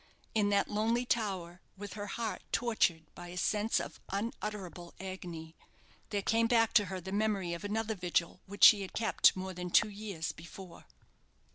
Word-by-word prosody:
In 210 -2 +2
that 200 0 +2
lonely 225 +4 +1
tower, 190 -7 -2 0.2
with 200 -1 -7
her 205 0 -5
heart 225 +1 -3
tortured 190 -9 +1
by 175 - -9
a 175 +1 -8
sense 210 +4 +1
of - - -7
unutterable 200 -4 -5
agony, 175 -4 -7 0.5
there 205 -2 -1
came 230 +2 +3
back 230 -2 +3
to 210 - +5
her 190 0 -5
the 190 +2 -7
memory 200 -4 0
of 170 - -6
another 220 +2 -1
vigil 180 -2 -1
which 200 +1 -4
she 210 -2 +10
had 190 - -6
kept 225 -1 +4
more 190 0 -4
than 180 0 -5
two 215 +4 +5
years 200 -5 -4
before. 175 +2 -12
200 Hz, 170 wpm, -32 LUFS, 180-215 Hz, 0.5 s, she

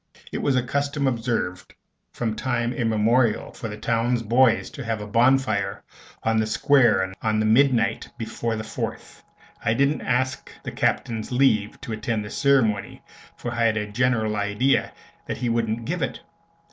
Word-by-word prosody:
It - - -3
was 140 - +1
a 125 - +2
custom 140 +2 -1
observed 115 -8 -2 0.4
from 110 -3 -2
time 120 0 -1
immemorial 115 0 +1
for 115 - -6
the 105 -1 -7
towns 115 +2 0
boys 115 +1 +3
to 140 - -7
have 115 -2 -2
a 105 - -6
bonfire 110 -3 +2 0.4
on 115 0 +1
the 110 - +1
Square 110 -6 +3
on 110 -1 +1
the 110 - +1
midnight 120 0 +3
before 115 0 -3
the 110 - -4
Fourth. 110 - -6 0.4
I 115 - +2
didn't 140 +4 +2
ask 130 +1 -1
the - - -5
Captain's 110 -1 -1
leave 110 -5 +2
to 115 - -5
attend 110 0 -2
this 105 - -7
ceremony, 115 -8 +1 0.3
for 120 - -5
I 120 -1 +1
had 110 -1 +2
a 105 -1 -3
general 110 -2 +1
idea 105 +7 +1 0.4
that - - -3
he 120 - -1
wouldn't 115 0 -1
give 175 +5 -2
it. 135 - -3
115 Hz, 165 wpm, -24 LUFS, 110-130 Hz, 0.4 s, boys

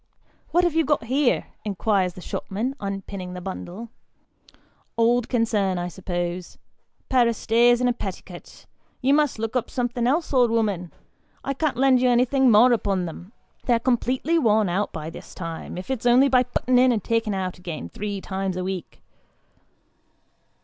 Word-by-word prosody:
" - - -36
What 350 +1 +3
have 350 -3 +2
you 325 0 +3
got 295 -3 +1
here? 260 +3 +1
" - - -41
inquires 195 -2 0
the 180 - -11
shopman, 225 +10 -4
unpinning 195 -2 -5
the - - -5
bundle 190 +4 -7 0.5
" - - -29 0.3
old 235 +1 +2
concern, 215 -6 +1
I 175 0 -3
suppose 175 -1 -4 0.5
pair 250 -2 +4
o' - - +2
stays 235 +2 +3
and 250 - +2
a 245 - +2
petticut. 190 -5 -9 0.4
You 270 +2 +4
must 295 -4 +2
look 225 +2 -4
up 240 -2 0
somethin' 245 -1 -1
else, 300 +4 0
old 250 -3 +4
'ooman; 205 -7 -1 0.5
I 275 - -2
can't 285 -1 -1
lend 260 -1 +4
you 255 - +4
anything 255 +2 +3
more 235 +3 +6
upon 195 -5 0
them; 175 +4 -9 0.3
they're 240 -2 +3
completely 260 +6 +1
worn 215 - +3
out 195 +4 -1
by 160 0 -6
this - - -11
time, 165 -1 -6
if 185 +8 -5
it's 245 -2 -1
only 250 +3 +6
by 255 -1 +5
putting 250 0 +1
in, 255 0 +5
and 220 -4 -1
taking 225 -3 0
out 185 -2 -3
again, 170 - -6
three 200 - -5
times 190 -1 -3
a 185 - -2
week." 185 -2 -6
225 Hz, 175 wpm, -24 LUFS, 190-250 Hz, 0.5 s, more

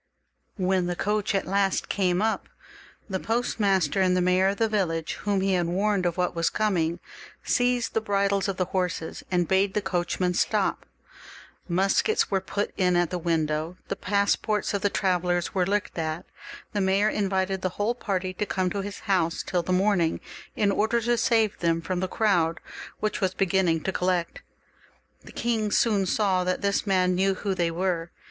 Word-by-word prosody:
When 185 -1 +1
the 175 - -2
coach 210 +2 0
at 195 - 0
last 195 0 0
came 185 0 +1
up, 220 0 -1 0.6
the 190 -3 -2
postmaster 195 -7 +1
and 185 -1 +3
the - - +3
mayor 180 +1 +3
of 200 +1 0
the 225 - +2
village, 175 -7 -1
whom 200 -2 +1
he 195 0 +1
had 175 -2 +1
warned 190 +1 +1
of 170 - -3
what 180 -1 0
was 165 0 +1
coming, 175 -6 0 0.4
seized 245 -1 +1
the 225 - +1
bridles 200 -2 +1
of 195 -2 -2
the 185 - +1
horses, 180 -3 -3
and 175 -2 +1
bade 190 +1 +2
the - - +3
coachman 180 -1 -1
stop. - - 0 0.8
Muskets 195 - +1
were 195 -1 +1
put 200 +2 -3
in 180 -2 +2
at 175 -1 +1
the 180 - -2
window, 160 0 -1
the - - -1
passports 205 +2 0
of 200 - -1
the 205 - +2
travellers 180 -3 0
were 180 -2 +1
looked 205 +1 -1
at; 160 +1 -3 0.5
the 205 - 0
mayor 195 +2 +3
in 205 -2 0
vited 190 0 -1
the 185 -1 -3
whole 210 +3 +1
party 190 -6 -3
to 210 +3 -2
come 185 -1 -1
to 200 - -2
his 200 0 -7
house 180 -5 0
till 180 -2 0
the 175 - -4
morn 195 +1 +3
ing, 165 -1 0 0.4
in 205 -2 +2
order 220 +4 +1
to 240 +1 +1
save 225 -3 +2
them 165 -1 +1
from 175 +2 -3
the 185 - -1
crowd, 175 -6 +1 0.4
which 215 0 -1
was 190 -1 0
beginning 185 -3 +2
to 190 - -1
collect. 180 -2 -1 0.8
The - - -12
king 225 -3 -1
soon 205 -3 +2
saw 190 -2 +1
that 185 0 -1
this 200 +1 0
man 185 -2 +3
knew 190 +1 +2
who 195 +1 -2
they 175 -2 0
were. 170 -1 -1
190 Hz, 190 wpm, -26 LUFS, 180-205 Hz, 0.8 s, and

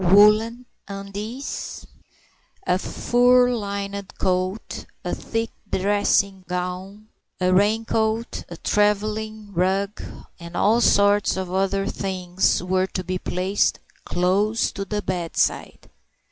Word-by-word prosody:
Woollen 210 +6 +5 0.2
undies, 205 +6 -6 0.8
a 180 - +2
fur 245 +3 +3
lined 200 -2 -4
coat, 185 +3 -2 0.2
a - - -1
thick 225 0 -3 0.2
dressing 200 0 +1
gown, 180 +4 -5 0.3
a 185 0 +2
raincoat, 220 +3 +1
a - - -8
travelling 210 0 0
rug, 195 +3 0 0.4
and 170 0 -7
all 225 +3 +4
sorts 205 -2 +4
of 185 -1 -4
other 195 +1 +1
things, 185 -2 0
were 185 +1 +1
to 185 - -4
be 185 +1 -3
placed 185 +3 0 0.3
close 200 +6 +1
to 195 - -5
the 210 +1 -3
bedside. 175 -3 -1
200 Hz, 105 wpm, -23 LUFS, 185-215 Hz, 0.8 s, Woollen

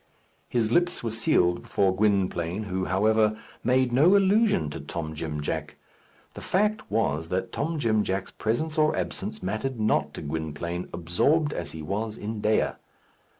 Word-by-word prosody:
His 115 -3 +1
lips 175 +2 +2
were 115 - -2
sealed 90 -6 +2
before 95 -2 +1
Gwynplaine, 95 -2 +1
who, 95 -2 -2
however, 110 +3 +2 0.3
made 130 0 +2
no 165 +10 +6
allusion 200 - +3
to - - -6
Tom 80 -2 -5
Jim 75 -1 -4
Jack. 75 0 -3 0.6
The - - -9
fact 210 +3 0
was 80 -7 0
that 95 +1 -2
Tom 160 +3 -2
Jim 110 -6 +2
Jack's 95 0 -2
presence 155 +9 -1
or 155 0 +3
absence 90 +3 -4
mattered 110 +6 -2
not 110 0 +1
to - - -6
Gwynplaine, 80 +3 -4
absorbed 140 - +1
as 85 - -5
he 80 -1 -7
was 105 +5 -3
in 105 0 -5
Dea. 110 +1 +2
105 Hz, 155 wpm, -26 LUFS, 85-125 Hz, 0.6 s, no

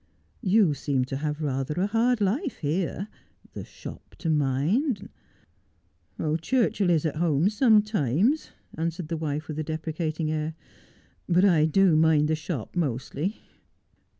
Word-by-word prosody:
You 195 -4 +4
seem 140 -2 -1
to 135 +1 -4
have 150 +1 -3
rather 135 0 -2
a 185 - +2
hard 230 +2 +1
life 255 - 0
here. 170 +5 -2 0.5
The - - -6
shop - - -11
to 165 - -1
mind 155 - 0 0.4
' - - -41
' 150 - -4
Churchill 215 -2 +1
is 165 -2 +2
at 155 -1 -1
home 165 +2 +2
sometimes,' 210 - +2 0.2
answered 165 0 -3
the 165 - -2
wife 155 -1 -3
with 155 -1 -5
a - - -1
deprecating 155 0 -3
air, 155 0 -2 0.4
' - - -32 0.3
but 180 +2 +4
I 165 -6 +4
do 180 +1 +4
mind 155 -1 +4
the 160 - +2
shop 155 -5 -5
mostly.' 150 - -2
160 Hz, 150 wpm, -26 LUFS, 150-195 Hz, 0.5 s, You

